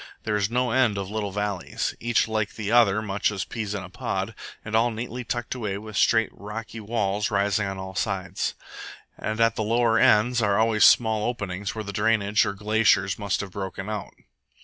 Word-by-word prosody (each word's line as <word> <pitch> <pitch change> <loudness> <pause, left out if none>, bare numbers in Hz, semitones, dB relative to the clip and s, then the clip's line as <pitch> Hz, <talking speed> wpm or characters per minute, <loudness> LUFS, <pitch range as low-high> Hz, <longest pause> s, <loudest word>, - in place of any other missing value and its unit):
There 105 -1 -1
is 100 -1 +1
no 125 0 0
end 125 -5 +3
of 100 0 -4
little 105 -2 -2
valleys, 105 -1 -2
each 120 -1 +1
like 110 -2 -2
the 105 -1 -3
other 110 -3 +4
much 100 -1 0
as 100 -3 -3
peas 105 -3 -4
in 100 - -4
a 90 - -9
pod, 95 +3 -3 0.3
and 105 +1 -3
all 115 +2 +4
neatly 120 +2 -5
tucked 120 0 -3
away 105 -6 -3
with 110 0 -9
straight, 115 +2 +3
rocky 110 +2 -7
walls 105 -2 -1
rising 100 0 +1
on 95 0 -4
all 95 0 -7
sides. 95 -1 -2 0.6
And 110 +1 -4
at 115 0 +3
the - - -2
lower 115 +1 +2
ends 120 +3 +4
are 100 -2 +2
always 110 -1 +4
small 110 -2 +4
openings 100 -3 -3
where 110 - -4
the 100 -1 -6
drainage 105 -1 +2
or - - -2
glaciers 105 -2 +2
must 100 -2 -1
have 100 -2 -7
broken 95 +1 -5
out. 105 -2 -5
105 Hz, 195 wpm, -25 LUFS, 100-115 Hz, 0.6 s, other